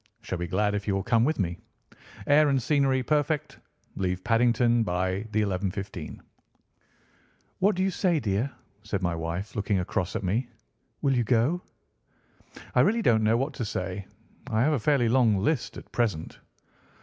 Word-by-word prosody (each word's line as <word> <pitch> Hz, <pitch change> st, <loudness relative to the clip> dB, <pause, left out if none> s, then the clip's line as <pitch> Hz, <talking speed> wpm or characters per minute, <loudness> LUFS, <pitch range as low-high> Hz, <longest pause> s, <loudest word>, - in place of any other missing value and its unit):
Shall 95 Hz, -4 st, -4 dB
be 85 Hz, -, -3 dB
glad 105 Hz, +4 st, +1 dB
if 105 Hz, 0 st, -3 dB
you 100 Hz, -, +1 dB
will 95 Hz, -, -1 dB
come 115 Hz, +1 st, +3 dB
with 155 Hz, +4 st, +1 dB
me. 85 Hz, -4 st, -2 dB, 0.7 s
Air 150 Hz, +1 st, +5 dB
and 135 Hz, -1 st, +2 dB
scenery 135 Hz, 0 st, +2 dB
perfect. 150 Hz, +1 st, 0 dB, 0.4 s
Leave 90 Hz, -1 st, -2 dB
Paddington 120 Hz, 0 st, +3 dB
by 95 Hz, +2 st, -1 dB
the 110 Hz, 0 st, +1 dB
11:15." 95 Hz, -3 st, -4 dB, 1.4 s
"What 200 Hz, +1 st, +3 dB
do 185 Hz, -, 0 dB
you 195 Hz, -, +1 dB
say, 175 Hz, -3 st, +1 dB
dear?" 110 Hz, +3 st, 0 dB, 0.3 s
said 105 Hz, -3 st, -3 dB
my 90 Hz, -1 st, +1 dB
wife, 85 Hz, +5 st, -4 dB
looking 105 Hz, -1 st, 0 dB
across 90 Hz, +1 st, -2 dB
at -, -, -2 dB
me. 115 Hz, +7 st, -1 dB, 0.5 s
"Will 135 Hz, -1 st, +3 dB
you 120 Hz, -, +2 dB
go?" 125 Hz, +9 st, +2 dB, 1.1 s
"I -, -, +3 dB
really 230 Hz, +2 st, +3 dB
don't 110 Hz, -, +4 dB
know 110 Hz, +2 st, +3 dB
what 135 Hz, +4 st, -1 dB
to 120 Hz, -, -4 dB
say. 95 Hz, -2 st, -4 dB, 0.4 s
I 110 Hz, -, +1 dB
have 155 Hz, +3 st, +3 dB
a 145 Hz, -, +1 dB
fairly 135 Hz, 0 st, +2 dB
long 115 Hz, -3 st, +4 dB
list 120 Hz, +7 st, -1 dB
at -, -, -12 dB
present." 105 Hz, -10 st, -2 dB
110 Hz, 170 wpm, -27 LUFS, 95-135 Hz, 1.4 s, Air